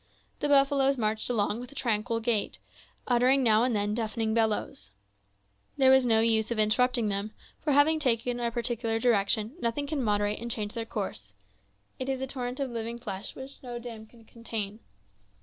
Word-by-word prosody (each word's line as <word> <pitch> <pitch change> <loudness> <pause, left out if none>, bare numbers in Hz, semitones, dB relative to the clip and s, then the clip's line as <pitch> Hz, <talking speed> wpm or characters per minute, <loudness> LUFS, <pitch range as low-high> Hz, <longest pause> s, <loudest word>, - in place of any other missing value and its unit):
The 295 - 0
buffaloes 275 -1 +4
marched 215 -1 -1
along 220 -2 0
with 250 +1 -9
a - - -14
tranquil 230 -2 -1
gait, 225 -3 0 0.5
uttering 255 +2 +3
now 220 -1 +4
and 245 -2 +1
then 205 0 0
deafening 220 0 -1
bellowings. 220 - -1 0.8
There 265 -2 +6
was 265 -1 +5
no 225 -1 +4
use 225 -1 +2
of 235 - -2
interrupting 225 +1 +3
them, 200 +2 -3 0.3
for, 300 - -1
having 305 +3 +4
taken 245 -3 0
a 235 -1 0
particular 235 -1 -1
direction, 220 -1 +1
nothing 235 +3 -1
can 290 -1 -2
moderate 205 -2 0
and 235 +2 -5
change 210 -2 -3
their 230 -1 -4
course; 190 - -5 0.7
it 260 +1 -3
is 265 -1 -1
a 265 - -2
torrent 250 -1 -5
of 270 -3 -2
living 230 0 -4
flesh 205 -5 -6
which 265 +1 -10
no 245 -2 -6
dam 230 -2 -9
could 230 -1 -20
contain. 220 -3 -5
235 Hz, 180 wpm, -28 LUFS, 215-255 Hz, 0.8 s, There